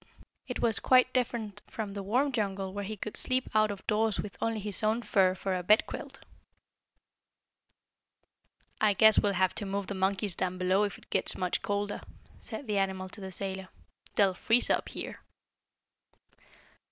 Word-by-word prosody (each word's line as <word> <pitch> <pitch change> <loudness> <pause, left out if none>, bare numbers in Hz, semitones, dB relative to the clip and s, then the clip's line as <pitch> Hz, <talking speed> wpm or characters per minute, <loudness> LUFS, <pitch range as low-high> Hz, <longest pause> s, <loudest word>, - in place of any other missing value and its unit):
It 250 - -4
was 225 -3 +4
quite 255 0 +4
different 235 -5 -2
from 210 -3 -5
the 200 - -4
warm 250 +9 +1
jungle 195 -5 -2
where 205 0 -4
he 215 +2 -5
could 210 +2 -6
sleep 255 0 +1
out 215 0 +4
of 200 -2 -6
doors 215 0 +1
with 205 - -5
only 225 -1 0
his 205 -1 -3
own 220 +2 +1
fur 190 -4 +3
for 190 0 -2
a 180 - -1
bedquilt. 210 +5 +1 2.6
"I 215 -1 +4
guess 220 +2 +7
we'll 205 -1 +1
have 185 0 +2
to 205 - -1
move 200 0 -2
the 200 - -5
monkeys 190 0 0
down 185 +1 -2
below, 185 +3 +2
if 200 - -5
it - - -21
gets - - +1
much 180 -1 -1
colder," 205 0 -2 0.4
said 285 - -7
the 210 -3 0
animal 190 -1 -1
man 185 - -8
to 205 - -8
the 190 0 -6
sailor. 190 0 -4 0.5
"They'll 195 -3 +4
freeze 230 +6 +3
up - - 0
here." - - -7
205 Hz, 175 wpm, -30 LUFS, 190-220 Hz, 2.6 s, guess